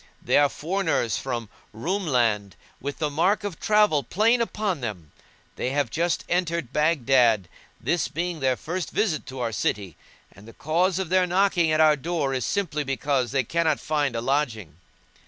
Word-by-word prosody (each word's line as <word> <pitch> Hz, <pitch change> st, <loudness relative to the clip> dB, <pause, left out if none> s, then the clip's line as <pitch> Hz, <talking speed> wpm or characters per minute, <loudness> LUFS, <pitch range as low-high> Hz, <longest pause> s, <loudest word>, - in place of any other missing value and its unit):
They -, -, +2 dB
are 145 Hz, -1 st, +4 dB
foreigners 165 Hz, -, -1 dB
from 120 Hz, -4 st, -4 dB, 0.3 s
Roum 180 Hz, -, -2 dB
land 110 Hz, -, +1 dB, 0.2 s
with 140 Hz, +1 st, -5 dB
the 150 Hz, -2 st, -1 dB
mark 190 Hz, +8 st, +1 dB
of 200 Hz, -5 st, -5 dB
travel 210 Hz, -8 st, +3 dB
plain 220 Hz, -, +2 dB
upon 210 Hz, -8 st, -2 dB
them; 90 Hz, -10 st, -6 dB, 0.5 s
they -, -, -1 dB
have 140 Hz, -3 st, -1 dB
just 170 Hz, +2 st, 0 dB
entered 170 Hz, -7 st, -1 dB
Baghdad, 130 Hz, -, +3 dB, 0.3 s
this 175 Hz, -, 0 dB
being 170 Hz, +2 st, -3 dB
their 130 Hz, -2 st, +2 dB
first 175 Hz, +7 st, -4 dB
visit 195 Hz, -8 st, -1 dB
to 130 Hz, -1 st, -7 dB
our 115 Hz, -2 st, -1 dB
city; 100 Hz, -3 st, -2 dB, 0.4 s
and 100 Hz, +2 st, -16 dB
the 115 Hz, -, -12 dB
cause 170 Hz, -, 0 dB
of 190 Hz, -4 st, -2 dB
their 185 Hz, 0 st, +3 dB
knocking 180 Hz, -3 st, +2 dB
at 155 Hz, -, +2 dB
our 155 Hz, -1 st, +6 dB
door 150 Hz, -2 st, -2 dB
is 130 Hz, -3 st, -1 dB
simply 160 Hz, -7 st, -1 dB
because 135 Hz, -2 st, -1 dB
they 135 Hz, -1 st, +1 dB
cannot 160 Hz, +3 st, 0 dB
find 145 Hz, -5 st, -1 dB
a 115 Hz, -, -1 dB
lodging. 115 Hz, -, -1 dB
150 Hz, 175 wpm, -25 LUFS, 125-175 Hz, 0.5 s, our